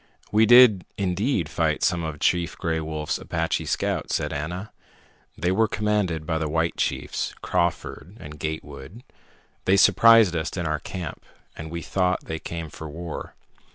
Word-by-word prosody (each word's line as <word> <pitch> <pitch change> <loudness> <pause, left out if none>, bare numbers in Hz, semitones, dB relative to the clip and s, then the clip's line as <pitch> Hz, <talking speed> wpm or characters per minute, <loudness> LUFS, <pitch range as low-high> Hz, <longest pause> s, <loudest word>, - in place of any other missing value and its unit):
"We 110 +1 +4
did 120 -6 +7
indeed 95 - 0
fight 80 0 -1
some 90 -2 +1
of 80 -2 -5
Chief 85 0 0
Gray 80 -2 -1
Wolf's 75 -1 -3
Apache - - -2
scouts," - - -1
said 75 0 -2
Ana. 85 +8 -5 0.7
"They 90 +3 0
were 110 +4 +3
commanded 105 -7 -1
by 80 0 -1
the 80 -1 -2
white 80 +2 0
chiefs, - - -2
Crawford 85 +2 -2
and 75 0 -10
Gatewood. 80 - -6 0.6
They 95 +1 +4
surprised 115 -1 +6
us 80 +3 -3
in 85 - -2
our 75 -1 -1
camp, 85 -1 -7 0.3
and 80 0 -7
we 85 0 -5
thought 90 -1 0
they 80 - -4
came 80 -1 -6
for 80 0 -8
war. 85 +1 -7
85 Hz, 155 wpm, -24 LUFS, 80-95 Hz, 0.7 s, did